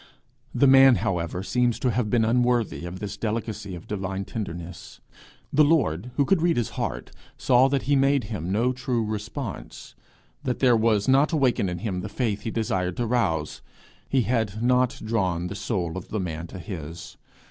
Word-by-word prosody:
The 140 - +3
man, 135 -1 +7
however, 90 -1 -2
seems 125 +2 +1
to 125 - 0
have 115 -2 -1
been 115 0 +2
unworthy 120 -5 +1
of 90 +1 -7
this 100 0 -6
delicacy 110 -3 -3
of 85 - -10
divine 95 -1 -4
tenderness. 90 -5 -7 0.5
The 150 - +6
Lord, 125 - +1
who 140 - +2
could 185 +2 +2
read 170 -3 +2
his 120 - 0
heart, - - -4 0.3
saw 130 0 +4
that 135 -1 0
he 145 +2 +2
made 135 -1 +3
him 100 -5 -4
no 120 +5 +1
true 125 -2 -1
response 110 - -6 0.5
that 125 - -2
there 125 -3 +4
was 110 -2 +2
not 140 +5 +4
awaked 135 -6 +2
in 90 -3 -1
him 90 -1 -3
the - - -6
faith 110 -5 -2
he - - -4
desired 95 -6 -1
to 120 - 0
rouse: 80 -11 -1 0.5
he 135 - +3
had 110 -2 -1
not 125 0 +2
drawn 95 -6 0
the - - -5
soul 90 -6 -2
of 95 - -6
the 110 - -2
man 85 -2 -4
to 95 - -9
his. 85 -3 -8
110 Hz, 180 wpm, -25 LUFS, 95-125 Hz, 0.5 s, man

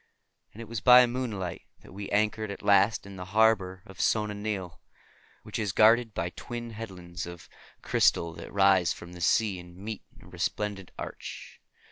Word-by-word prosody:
And 110 - -15
it - - -12
was 115 -3 -4
by 125 +3 +8
moonlight 115 -8 -4 0.2
that - - -15
we 100 +1 -6
anchored 110 +1 0
at 100 - -7
last 100 +2 +4
in 100 -1 -10
the 90 - -6
harbor 95 -4 +3
of 95 -4 -8
Sona 105 -1 +1
Nyl, 100 -4 -4 0.6
which - - -5
is 105 -4 -1
guarded 115 +1 +5
by 85 +1 -2
twin 120 +4 -7
headlands 90 -6 -7
of 85 -1 -10 0.4
crystal 85 -1 +2
that - - -10
rise 95 -3 +4
from 85 +1 -11
the 90 - -10
sea 100 +1 +2
and 90 0 -13
meet 105 +2 -6 0.2
in - - -16
a - - -15
resplendent, 100 -3 -3
arch. - - -8
100 Hz, 175 wpm, -28 LUFS, 90-110 Hz, 0.6 s, by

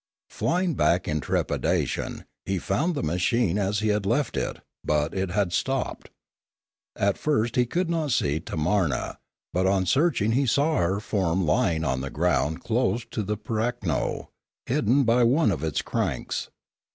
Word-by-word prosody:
Flying 170 - 0
back 85 - +2
in 75 - 0
trepidation, - - -1 0.2
he 95 - 0
found 140 - 0
the - - -2
machine 90 +5 +1
as 100 +2 0
he 110 - +1
had 105 -1 +1
left 120 +8 0
it, - - -2 0.3
but 75 +1 0
it 95 -1 -1
had 95 -1 0
stopped. 135 +8 -2 0.9
At 100 0 +1
first 120 -6 0
he 125 -1 +3
could 175 +8 0
not 165 -3 -1
see 75 - +1
Tamarua; 80 -3 -1 0.3
but 95 +1 +2
on 95 -1 +2
searching 130 - +2
he 135 +3 +2
saw 145 +6 +2
her 95 +3 +1
form 95 -4 0
lying 80 +1 +2
on 65 -2 0
the 70 - -4
ground 80 -1 0
close 120 0 0
to - - -2
the 105 +1 -2
pirakno, 110 - -2 0.4
hidden 135 0 +2
by 120 +1 +3
one 125 +1 +4
of 80 -5 -3
its 80 -2 -1
cranks. - - -2
105 Hz, 160 wpm, -26 LUFS, 85-125 Hz, 0.9 s, one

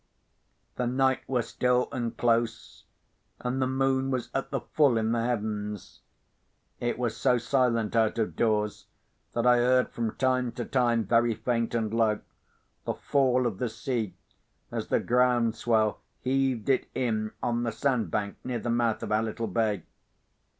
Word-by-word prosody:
The 125 - 0
night 130 +1 +2
was 125 -4 0
still 125 0 +1
and 120 -2 -3
close, 115 -1 0 0.6
and 125 +2 -1
the 130 - +2
moon 135 0 +1
was 130 -2 -2
at 135 - -2
the 135 -3 -2
full 135 0 +2
in 110 0 +1
the 115 -1 +1
heavens. 105 -4 -3 0.8
It 120 0 -1
was 120 -2 -1
so 125 - +2
silent 120 -3 +1
out 110 -1 +2
of 110 -2 -1
doors, 105 -2 0 0.5
that 115 0 0
I 125 0 +6
heard 125 +1 +3
from 115 -2 -3
time 130 -2 +1
to 120 - -4
time, 120 -3 +2
very 115 +2 +3
faint 115 -1 -1
and 110 -2 -1
low, 110 -2 +2 0.6
the - - -2
fall 130 -3 +2
of 110 -6 -2
the 125 - -1
sea, 110 -3 -3 0.6
as - - -3
the - - +2
ground 120 -2 +2
swell 110 -2 +1 0.2
heaved 130 -3 0
it 135 - +2
in 110 -3 -1
on 120 0 0
the 120 -1 -1
sand 115 - 0
bank 100 +3 -2
near 125 -1 -2
the 120 +1 -2
mouth 115 -2 +1
of - - -4
our 105 +1 +3
little 115 +1 -3
bay. 105 -3 0
120 Hz, 165 wpm, -28 LUFS, 110-125 Hz, 0.8 s, I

